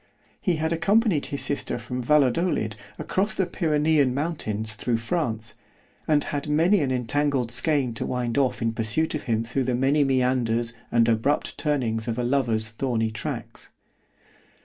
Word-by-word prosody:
He 180 - +1
had 160 +1 -1
accompanied 200 -1 +2
his 140 - -1
sister 145 - -1
from 125 +2 -5
Valadolid 135 -3 +2 0.2
across 205 +3 -1
the 190 - +1
Pyrenean 150 -5 +1
mountains 110 -9 -2
through 115 +2 -1
France, 115 -4 -2 0.5
and 150 -2 +3
had 145 0 -4
many 170 +7 +4
an 140 -4 0
entangled 130 0 0
skein 135 -1 +1
to - - -3
wind 120 -2 -2
off 135 -4 +1
in 115 -1 0
pursuit 115 +9 0
of 155 - -4
him 115 0 +1
through 125 +3 -2
the 125 -1 0
many 135 +4 +3
meanders 125 -3 +1 0.2
and 115 -1 +4
abrupt 115 +6 +1
turnings 120 -7 -1
of 115 0 -2
a 125 - -1
lover's 120 -4 0
thorny 115 -2 -1
tracks. 110 - -6
130 Hz, 155 wpm, -25 LUFS, 115-150 Hz, 0.5 s, many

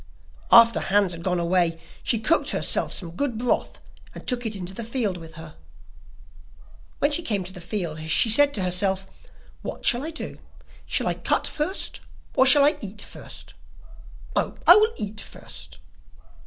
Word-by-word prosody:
After 230 -1 +7
Hans 200 -2 +1
had 170 -1 -7
gone 180 0 -1
away, 170 -1 0 0.2
she 230 - 0
cooked 265 +10 +1
herself - - +1
some 175 -4 -2
good 265 -2 -2
broth 245 +1 -1 0.4
and - - -10
took 245 -2 +1
it 215 - -4
into 185 -1 -4
the 230 - -6
field 225 -4 -2
with 165 -2 -11
her. 160 -1 -11 1.4
When 285 - +1
she 295 - +3
came 210 - -2
to 185 +1 -7
the 180 - -9
field 170 -4 -4
she 160 - +4
said 290 +5 +7
to 195 - -2
herself: 190 +1 0 0.6
'What - - -7
shall 245 +1 +2
I 315 - -3
do; 330 - -7 0.5
shall - - +2
I - - +1
cut - - -1
first, 315 +6 -3 0.4
or 260 - +4
shall 280 +1 +7
I 295 - +3
eat 205 0 -9
first? - - -11 0.8
Oh, - - -1
I 350 - +10
will 430 +2 +3
eat 210 0 -4
first. 65 -1 -10
205 Hz, 170 wpm, -24 LUFS, 180-255 Hz, 1.4 s, I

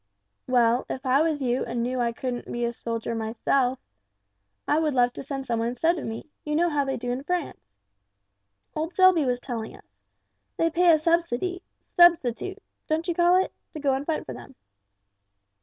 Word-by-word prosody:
"Well, 245 -1 +3
if 265 - -5
I 260 +3 +4
was 310 -3 0
you 250 0 0
and 235 0 -2
knew 250 +1 -2
I 235 -1 +1
couldn't 245 +1 -5
be 240 0 -1
a 235 - -2
soldier 230 -1 -4
myself, 240 +4 0 0.9
I 300 - +3
would 305 -4 0
love 245 -1 +3
to - - -7
send 270 0 -5
some 235 -2 -1
one 230 - 0
instead 320 +8 +1
of - - -6
me 225 +7 -7
you 300 0 -2
know 340 +2 +2
how 290 -1 +1
they 270 - -2
do 245 0 -3
in 250 +2 -3
France. 300 - -4 1.0
Old 320 +3 -3
Selby 370 -5 +5
was 250 -1 0
telling 235 -4 -5
us. 100 0 -24 0.6
They 330 0 +2
pay 350 +1 +5
a 320 - +6
subsidy 335 +2 0 0.3
substitute 345 - +4 0.3
don't 320 +2 -1
you 345 - +1
call 350 +2 +4
it? - - -9 0.2
to 310 - -6
go 280 -2 +1
and 265 +1 -1
fight 315 +1 -2
for - - -6
them." 270 - -12
270 Hz, 190 wpm, -26 LUFS, 240-330 Hz, 1.0 s, a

